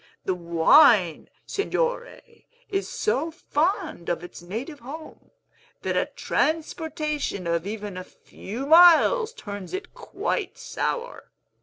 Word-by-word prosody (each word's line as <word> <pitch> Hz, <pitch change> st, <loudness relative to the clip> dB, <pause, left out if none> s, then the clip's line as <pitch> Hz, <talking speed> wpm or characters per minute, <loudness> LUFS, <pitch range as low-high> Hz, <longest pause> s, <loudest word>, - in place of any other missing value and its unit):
The 185 Hz, -, +1 dB
wine, 170 Hz, -, +4 dB, 0.2 s
Signore, 485 Hz, +4 st, -2 dB, 0.5 s
is 395 Hz, -1 st, -2 dB
so 330 Hz, -7 st, -1 dB
fond 325 Hz, -, -2 dB
of 175 Hz, 0 st, -2 dB
its 175 Hz, -, -10 dB
native 230 Hz, -, -6 dB
home, 300 Hz, +6 st, -10 dB, 0.5 s
that -, -, -1 dB
a -, -, +1 dB
transportation 310 Hz, -, -2 dB
of 170 Hz, +2 st, -1 dB
even 205 Hz, -2 st, -5 dB
a 185 Hz, -, -5 dB
few 225 Hz, +6 st, -8 dB
miles 350 Hz, -, +6 dB
turns 205 Hz, -, -7 dB
it 385 Hz, -, -7 dB
quite -, -, -3 dB
sour. -, -, -4 dB
295 Hz, 115 wpm, -25 LUFS, -, 0.5 s, miles